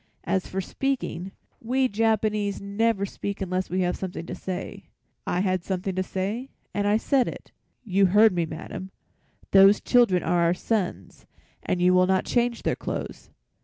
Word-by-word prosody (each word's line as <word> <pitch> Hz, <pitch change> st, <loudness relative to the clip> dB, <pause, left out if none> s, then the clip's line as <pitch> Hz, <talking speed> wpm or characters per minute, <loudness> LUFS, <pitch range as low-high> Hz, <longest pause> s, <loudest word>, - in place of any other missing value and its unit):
As 190 Hz, -1 st, -1 dB
for 190 Hz, -, -3 dB
speaking, 195 Hz, -6 st, -3 dB, 0.3 s
we 255 Hz, +3 st, +1 dB
Japanese 215 Hz, -2 st, 0 dB
never 200 Hz, +1 st, 0 dB
speak 200 Hz, 0 st, -5 dB
unless 185 Hz, -1 st, -2 dB
we 185 Hz, +1 st, 0 dB
have 180 Hz, 0 st, 0 dB
something 180 Hz, -3 st, -5 dB
to -, -, -6 dB
say. 185 Hz, 0 st, -6 dB, 0.4 s
I 180 Hz, -, 0 dB
had 185 Hz, -2 st, 0 dB
something 190 Hz, 0 st, -2 dB
to 185 Hz, -, -1 dB
say, 200 Hz, +8 st, -3 dB, 0.2 s
and 205 Hz, 0 st, 0 dB
I 210 Hz, +1 st, +4 dB
said 260 Hz, +2 st, +2 dB
it. -, -, -8 dB, 0.3 s
You 195 Hz, -3 st, +3 dB
heard 210 Hz, +3 st, +5 dB
me, 170 Hz, -2 st, 0 dB
madam. 185 Hz, +4 st, -7 dB, 0.6 s
Those 195 Hz, +1 st, +7 dB
children 235 Hz, -8 st, +3 dB
are 175 Hz, -1 st, +1 dB
our 170 Hz, +1 st, +3 dB
sons 210 Hz, -2 st, -3 dB, 0.3 s
and 175 Hz, -1 st, -1 dB
you 180 Hz, 0 st, +5 dB
will 185 Hz, 0 st, +4 dB
not 190 Hz, 0 st, +2 dB
change 240 Hz, -1 st, 0 dB
their -, -, +1 dB
clothes." -, -, -6 dB
195 Hz, 165 wpm, -25 LUFS, 185-220 Hz, 0.6 s, Those